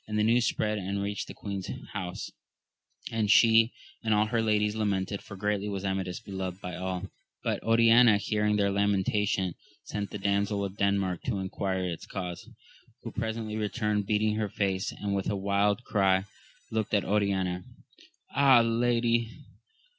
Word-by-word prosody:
The 105 Hz, -, -7 dB
news 120 Hz, +2 st, +3 dB
spread 105 Hz, 0 st, 0 dB
and 100 Hz, +1 st, -3 dB
reached 100 Hz, 0 st, -3 dB
the -, -, -9 dB
queen's 100 Hz, -2 st, -5 dB, 0.2 s
house, 90 Hz, -1 st, -5 dB, 0.8 s
and 110 Hz, -2 st, 0 dB
she 115 Hz, +1 st, +6 dB, 0.3 s
and 110 Hz, -1 st, +2 dB
all 105 Hz, +1 st, +3 dB
her 115 Hz, +1 st, 0 dB
ladies 105 Hz, -1 st, +2 dB
lamented, 100 Hz, -2 st, -1 dB
for 100 Hz, -, -10 dB
greatly 105 Hz, +1 st, -1 dB
was 100 Hz, -1 st, -4 dB
Amadis 95 Hz, -2 st, -2 dB
beloved 95 Hz, -4 st, -5 dB
by 90 Hz, -3 st, -6 dB
aU; 95 Hz, +1 st, -4 dB, 0.3 s
but -, -, -1 dB
Oriana 115 Hz, 0 st, +6 dB
hearing 105 Hz, 0 st, 0 dB
their 100 Hz, -1 st, +2 dB
lamentation 100 Hz, -1 st, +1 dB, 0.3 s
sent 100 Hz, -1 st, -4 dB
the -, -, -5 dB
Damsel 100 Hz, 0 st, 0 dB
of 95 Hz, 0 st, -6 dB
Denmark 100 Hz, -3 st, 0 dB
to 115 Hz, -5 st, -1 dB
enquire 95 Hz, -1 st, -2 dB
its 85 Hz, -2 st, -6 dB
cause, 90 Hz, -3 st, -6 dB, 0.5 s
who -, -, -6 dB
presently 110 Hz, -1 st, -3 dB
returned 105 Hz, -1 st, -1 dB
beating 105 Hz, 0 st, +1 dB
her 110 Hz, -2 st, -1 dB
face, 95 Hz, -1 st, -1 dB
and 100 Hz, -1 st, -3 dB
with 100 Hz, -1 st, -1 dB
a 105 Hz, -, 0 dB
wild 100 Hz, +3 st, +1 dB
cry 95 Hz, -3 st, +2 dB, 0.5 s
looked 110 Hz, -1 st, 0 dB
at 100 Hz, -, +1 dB
Oriana. 95 Hz, -3 st, 0 dB, 0.7 s
Ah, 135 Hz, -3 st, +7 dB
lady 115 Hz, 0 st, +1 dB
100 Hz, 155 wpm, -29 LUFS, 95-110 Hz, 0.8 s, Ah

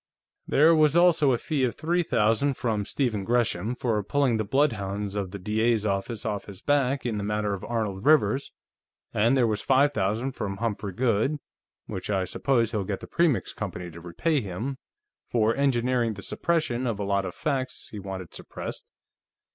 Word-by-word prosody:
"There 155 Hz, +4 st, +5 dB
was 155 Hz, -1 st, +4 dB
also 170 Hz, -5 st, +5 dB
a 120 Hz, -, +2 dB
fee 145 Hz, +2 st, -1 dB
of 120 Hz, -3 st, 0 dB
three 170 Hz, +3 st, +1 dB
thousand 125 Hz, 0 st, +2 dB
from 110 Hz, -4 st, -1 dB
Stephen 115 Hz, -7 st, -1 dB
Gresham, 115 Hz, -1 st, 0 dB
for 115 Hz, -4 st, 0 dB
pulling 130 Hz, +2 st, +1 dB
the 110 Hz, -, 0 dB
bloodhounds 105 Hz, -5 st, 0 dB
of 100 Hz, -2 st, -2 dB
the 100 Hz, -, -6 dB
D.A.'s 110 Hz, +3 st, +1 dB
office 100 Hz, +2 st, -2 dB
off 105 Hz, -3 st, -2 dB
his 100 Hz, -3 st, -10 dB
back 140 Hz, -2 st, +1 dB
in 110 Hz, -4 st, -1 dB
the -, -, -3 dB
matter 105 Hz, 0 st, -1 dB
of 100 Hz, -, -5 dB
Arnold 105 Hz, -5 st, -2 dB
Rivers, 145 Hz, -2 st, +3 dB, 0.6 s
and 115 Hz, +6 st, +3 dB
there 125 Hz, -, +4 dB
was 105 Hz, -2 st, 0 dB
five 140 Hz, +2 st, +3 dB
thousand 110 Hz, +6 st, 0 dB
from 100 Hz, -5 st, -4 dB
Humphrey 105 Hz, -3 st, -3 dB
Goode, 120 Hz, +5 st, +1 dB, 0.5 s
which 95 Hz, -, -6 dB
I 95 Hz, -2 st, +1 dB
suppose 115 Hz, +2 st, +1 dB
he'll 105 Hz, -4 st, -1 dB
get 95 Hz, 0 st, -4 dB
the -, -, -7 dB
Premix 165 Hz, -7 st, +1 dB
Company 90 Hz, -4 st, -5 dB
to 85 Hz, +1 st, -11 dB
repay 135 Hz, -, 0 dB
him, 110 Hz, +7 st, -4 dB, 0.5 s
for 115 Hz, -1 st, +2 dB
engineering 125 Hz, -4 st, +1 dB
the 100 Hz, -, -9 dB
suppression 155 Hz, -, 0 dB
of 115 Hz, -4 st, -1 dB
a -, -, -1 dB
lot 100 Hz, 0 st, +1 dB
of -, -, -5 dB
facts 135 Hz, -4 st, -2 dB
he 105 Hz, -, -7 dB
wanted 95 Hz, -3 st, -7 dB
suppressed. -, -, -7 dB
115 Hz, 180 wpm, -26 LUFS, 100-135 Hz, 0.6 s, There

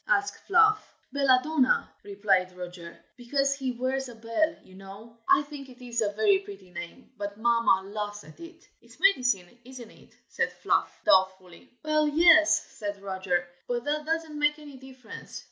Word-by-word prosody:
asked 405 Hz, -5 st, 0 dB
Fluff. 425 Hz, +2 st, +3 dB, 0.2 s
"Belladonna," 275 Hz, 0 st, +2 dB
replied 195 Hz, -3 st, 0 dB
Roger, 175 Hz, -1 st, -9 dB, 0.2 s
"because 275 Hz, +3 st, 0 dB
he 265 Hz, -2 st, -3 dB
wears 260 Hz, +2 st, -2 dB
a 240 Hz, -, -11 dB
bell, 230 Hz, +8 st, -1 dB
you 185 Hz, -, -19 dB
know. 195 Hz, +4 st, -12 dB
I 280 Hz, -, +5 dB
think 285 Hz, -2 st, -10 dB
it 250 Hz, 0 st, -15 dB
is 240 Hz, -2 st, -3 dB
a 205 Hz, -2 st, +1 dB
very 220 Hz, -, +3 dB
pretty 395 Hz, -, -12 dB
name, 175 Hz, +10 st, -9 dB
but 205 Hz, 0 st, -5 dB
Mamma 230 Hz, -4 st, +2 dB
laughs 210 Hz, -1 st, -5 dB
at 155 Hz, -, -16 dB
it." 335 Hz, +1 st, -13 dB
"It's -, -, -19 dB
medicine, 245 Hz, -, +2 dB
isn't 250 Hz, -2 st, -11 dB
it?" -, -, -21 dB
said -, -, -1 dB
Fluff, -, -, -1 dB
doubtfully. 190 Hz, -, +1 dB
"Well, 305 Hz, 0 st, +2 dB
yes!" 315 Hz, +1 st, +5 dB
said 205 Hz, -2 st, -4 dB
Roger; 190 Hz, -2 st, -2 dB, 0.2 s
"but 240 Hz, -1 st, -2 dB
that 300 Hz, +2 st, -1 dB
doesn't 320 Hz, -2 st, -2 dB
make 295 Hz, 0 st, +2 dB
any 290 Hz, -3 st, -12 dB
difference. 260 Hz, -3 st, -11 dB
250 Hz, 160 wpm, -27 LUFS, 200-295 Hz, 0.2 s, I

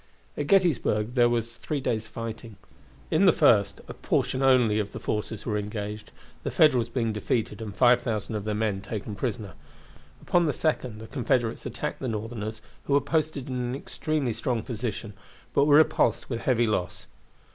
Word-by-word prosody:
At 145 Hz, -, -3 dB
Gettysburg 135 Hz, -, +2 dB
there 120 Hz, -2 st, +4 dB
was 115 Hz, -1 st, -2 dB
three 150 Hz, +4 st, -3 dB
days' 115 Hz, -4 st, -2 dB
fighting. 115 Hz, 0 st, -7 dB, 0.6 s
In 165 Hz, +5 st, +4 dB
the 185 Hz, -, +8 dB
first 100 Hz, -8 st, +3 dB
a -, -, -7 dB
portion 130 Hz, -, -1 dB
only 125 Hz, -5 st, +4 dB
of 105 Hz, -1 st, -3 dB
the -, -, -5 dB
forces 105 Hz, 0 st, -3 dB
were 105 Hz, -3 st, 0 dB
engaged, 105 Hz, 0 st, -5 dB, 0.3 s
the -, -, -3 dB
Federals 130 Hz, -7 st, +4 dB
being 115 Hz, -2 st, -1 dB
defeated 105 Hz, 0 st, -2 dB
and 105 Hz, -3 st, -6 dB
5,000 115 Hz, -2 st, +2 dB
of 105 Hz, -2 st, -3 dB
their 105 Hz, 0 st, -2 dB
men 105 Hz, -3 st, -1 dB
taken 105 Hz, +1 st, -5 dB
prisoners. 105 Hz, -4 st, -4 dB, 0.7 s
Upon 175 Hz, -2 st, +2 dB
the 150 Hz, -, +1 dB
second 130 Hz, -8 st, -1 dB
the -, -, -7 dB
Confederates 120 Hz, -3 st, -1 dB
attacked 150 Hz, -, -4 dB
the 130 Hz, -, -3 dB
Northerners, 110 Hz, -1 st, -4 dB, 0.2 s
who 140 Hz, -, 0 dB
were 140 Hz, -, +6 dB
posted 155 Hz, -1 st, -1 dB
in 130 Hz, -, -4 dB
an 125 Hz, 0 st, -2 dB
extremely 145 Hz, -2 st, -2 dB
strong 115 Hz, 0 st, -2 dB
position, 115 Hz, -3 st, -4 dB, 0.4 s
but 140 Hz, -, +4 dB
were 145 Hz, -1 st, +5 dB
repulsed 155 Hz, -3 st, +2 dB
with 115 Hz, -, -1 dB
heavy 120 Hz, -2 st, +2 dB
loss. 100 Hz, -5 st, -2 dB
115 Hz, 175 wpm, -27 LUFS, 105-130 Hz, 0.7 s, the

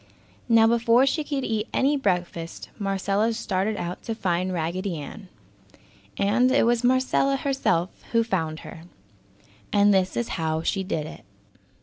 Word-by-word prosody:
Now 225 Hz, -1 st, +6 dB
before 235 Hz, +2 st, +4 dB
she 305 Hz, +3 st, 0 dB
could 280 Hz, -2 st, -3 dB
eat 220 Hz, -1 st, -1 dB
any 280 Hz, +2 st, +3 dB
breakfast, 175 Hz, -8 st, -2 dB
Marcella 200 Hz, +2 st, 0 dB
started 205 Hz, -1 st, -1 dB
out 175 Hz, +1 st, -5 dB
to 225 Hz, -, -3 dB
find 185 Hz, -3 st, -1 dB
Raggedy 175 Hz, +2 st, -2 dB
Ann. 190 Hz, +7 st, -9 dB, 0.9 s
And, 245 Hz, +6 st, +3 dB
it -, -, +4 dB
was 240 Hz, 0 st, +2 dB
Marcella 260 Hz, +2 st, +2 dB
herself 265 Hz, -11 st, 0 dB, 0.2 s
who 230 Hz, -1 st, +3 dB
found 165 Hz, -7 st, -2 dB
her. 165 Hz, 0 st, -11 dB, 0.9 s
And 205 Hz, 0 st, +4 dB
this 190 Hz, -1 st, +1 dB
is 235 Hz, -, -1 dB
how 160 Hz, 0 st, -1 dB
she 195 Hz, +2 st, 0 dB
did 165 Hz, -5 st, -2 dB
it. -, -, -10 dB
205 Hz, 145 wpm, -25 LUFS, 180-235 Hz, 0.9 s, Now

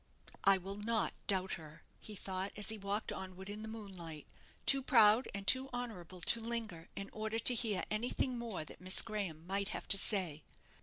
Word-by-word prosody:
"I 195 Hz, 0 st, +7 dB
will 195 Hz, +2 st, -6 dB
not 220 Hz, +1 st, +1 dB
doubt 190 Hz, -1 st, +1 dB
her," 155 Hz, -2 st, -9 dB, 0.2 s
he 215 Hz, -, -10 dB
thought, 190 Hz, 0 st, -4 dB
as 210 Hz, -1 st, -3 dB
he 220 Hz, -, -1 dB
walked 200 Hz, +2 st, -2 dB
onward 190 Hz, +1 st, -7 dB
in 210 Hz, +1 st, -6 dB
the 220 Hz, -, -6 dB
moonlight, 185 Hz, -8 st, -8 dB, 0.4 s
too 275 Hz, 0 st, +6 dB
proud 230 Hz, -3 st, +5 dB
and 200 Hz, 0 st, -6 dB
too 260 Hz, +7 st, +4 dB
honourable 185 Hz, -8 st, -6 dB
to 230 Hz, +6 st, +2 dB
linger 225 Hz, -8 st, -4 dB
in 200 Hz, 0 st, -6 dB
order 220 Hz, +1 st, -2 dB
to 230 Hz, +2 st, +5 dB
hear 225 Hz, -4 st, +1 dB
anything 245 Hz, +3 st, 0 dB
more 230 Hz, -9 st, -4 dB
that -, -, -13 dB
Miss 185 Hz, +1 st, +7 dB
Graham 195 Hz, -8 st, -4 dB
might 195 Hz, +2 st, 0 dB
have -, -, -5 dB
to 195 Hz, -, +6 dB
say. 180 Hz, -8 st, +2 dB
200 Hz, 190 wpm, -35 LUFS, 185-225 Hz, 0.4 s, I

